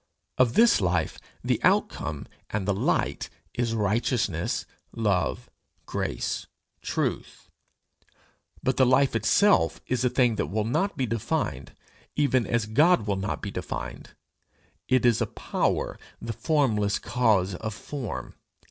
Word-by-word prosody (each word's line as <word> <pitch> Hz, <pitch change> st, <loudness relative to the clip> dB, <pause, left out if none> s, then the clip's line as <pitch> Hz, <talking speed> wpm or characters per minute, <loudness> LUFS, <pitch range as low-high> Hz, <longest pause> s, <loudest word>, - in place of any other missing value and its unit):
Of 125 Hz, -2 st, +4 dB
this 230 Hz, -, +5 dB
life 90 Hz, -3 st, 0 dB, 0.2 s
the -, -, +1 dB
outcome 75 Hz, -1 st, +1 dB, 0.2 s
and 100 Hz, -2 st, -2 dB
the 100 Hz, -, +3 dB
light 95 Hz, -, 0 dB, 0.2 s
is 115 Hz, -2 st, -1 dB
righteousness, 110 Hz, +3 st, 0 dB, 0.3 s
love, 105 Hz, -6 st, 0 dB, 0.4 s
grace, -, -, -3 dB, 0.3 s
truth; -, -, -3 dB, 1.1 s
but 130 Hz, -, +1 dB
the 130 Hz, -, +5 dB
life 130 Hz, 0 st, +3 dB
itself 200 Hz, -, +3 dB
is 125 Hz, -1 st, -1 dB
a 125 Hz, -, +3 dB
thing 125 Hz, -3 st, +2 dB
that -, -, -1 dB
will 105 Hz, +6 st, -1 dB
not 190 Hz, -, 0 dB
be 130 Hz, -, +1 dB
defined, 110 Hz, -, -2 dB, 0.4 s
even 130 Hz, -4 st, +2 dB
as 120 Hz, -2 st, +1 dB
God 130 Hz, +3 st, +4 dB
will 100 Hz, -2 st, 0 dB
not 95 Hz, +1 st, -3 dB
be -, -, -3 dB
defined: -, -, -6 dB, 0.7 s
it 130 Hz, -1 st, +3 dB
is 120 Hz, -3 st, +4 dB
a -, -, +1 dB
power, -, -, -1 dB, 0.2 s
the 115 Hz, -, -4 dB
formless 115 Hz, -9 st, +1 dB
cause 105 Hz, -6 st, +1 dB
of 110 Hz, +5 st, -4 dB
form. 135 Hz, -3 st, -6 dB
115 Hz, 130 wpm, -26 LUFS, 105-130 Hz, 1.1 s, this